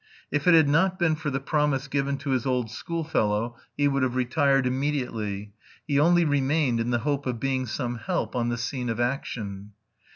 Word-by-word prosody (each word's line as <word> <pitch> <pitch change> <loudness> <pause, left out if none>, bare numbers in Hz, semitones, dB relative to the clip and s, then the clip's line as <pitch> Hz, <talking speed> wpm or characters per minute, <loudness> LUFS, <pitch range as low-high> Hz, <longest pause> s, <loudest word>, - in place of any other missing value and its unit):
If 145 +3 -1
it 175 - +8
had 160 -3 +6
not 175 +6 +3
been 165 -3 +2
for 155 0 -3
the 135 0 -1
promise 145 -1 0
given 140 0 -1
to 140 - 0
his 130 0 0
old 125 -4 0
schoolfellow 120 -9 -1 0.2
he 145 - +3
would 140 -1 +1
have 130 -1 0
retired 135 +1 +2
immediately; 125 -7 -2 0.3
he 140 -3 +1
only 170 +2 +4
remained 140 -3 +1
in 115 +1 -1
the 120 - +2
hope 145 -2 -1
of 120 -2 -2
being 130 0 -1
some 120 0 -3
help 115 - -2
on 120 -1 0
the 120 - -1
scene 125 +1 -3
of 115 0 -2
action. 105 -5 -3
135 Hz, 195 wpm, -26 LUFS, 120-145 Hz, 0.3 s, it